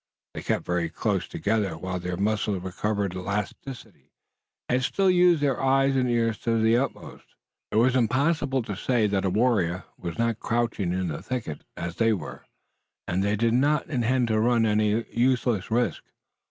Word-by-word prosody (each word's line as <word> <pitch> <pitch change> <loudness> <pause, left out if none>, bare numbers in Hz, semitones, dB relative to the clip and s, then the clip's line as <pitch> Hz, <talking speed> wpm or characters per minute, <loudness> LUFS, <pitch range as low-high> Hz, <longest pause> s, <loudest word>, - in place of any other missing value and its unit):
They - - -6
kept - - -1
very 85 -1 -1
close - - -1
together, 100 -5 -1
while 90 +2 -4
their 90 0 -4
muscles 105 -2 0
recovered 100 +1 -2
elasticity, 100 - -5 0.6
and 125 +1 +1
still 190 +7 +2
used 175 -4 +4
their 135 -3 +1
eyes 135 0 +3
and 130 -1 +1
ears 115 -2 +1
to 115 -1 0
the 110 +1 +4
utmost. 135 +3 -4 0.3
It - - -5
was 125 +3 +4
impossible 135 +2 +1
to 105 -3 -5
say 115 +2 +1
that 100 -2 0
a - - +2
warrior 95 -4 +1 0.2
was 85 +2 -5
not 115 - +2
near 115 - +1
crouching 115 -6 -1
in 90 -1 -1
the 75 - -5
thicket 120 - -5
as 85 0 -5
they 115 -1 +3
were, 85 -8 -7 0.6
and 90 +2 0
they 100 +1 +1
did 115 +2 +1
not 145 +5 +2
intend 125 -1 +1
to 110 -1 +2
run 115 0 +3
any 105 +1 +1
useless 120 -4 +1
risk. 120 +2 0
115 Hz, 175 wpm, -26 LUFS, 95-125 Hz, 0.6 s, used